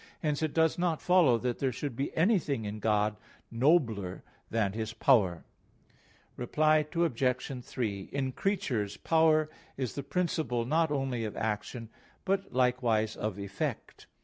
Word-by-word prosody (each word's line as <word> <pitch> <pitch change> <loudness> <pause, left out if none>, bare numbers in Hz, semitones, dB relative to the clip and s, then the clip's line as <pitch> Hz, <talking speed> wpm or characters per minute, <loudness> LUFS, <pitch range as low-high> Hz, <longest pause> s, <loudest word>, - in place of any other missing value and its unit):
Hence 150 -1 0
it 155 -2 -1
does 160 0 +3
not 175 -3 +1
follow 175 -10 +4
that 125 0 -2
there 135 -2 +1
should 135 +1 -4
be 135 +3 -2
anything 160 - +2
in 105 +1 -5
God 105 -1 +1 0.3
nobler 115 - +1 0.3
than 110 -4 0
His 110 0 -4
power. 105 - +3 0.9
Reply 155 +4 +2
Obj. 130 -5 0
3: 105 -6 -4
In 135 -1 -1
creatures, 130 - -1
power 160 -1 +3 0.3
is 130 -3 -2
the 140 - -4
principle 140 -6 -1
not 160 +5 +2
only 135 -5 -1
of 110 - -5
action, 110 +2 -3 0.4
but 195 0 0
likewise 125 -4 +1
of 105 -2 -3
effect. 100 -1 -5
125 Hz, 140 wpm, -30 LUFS, 110-155 Hz, 0.9 s, follow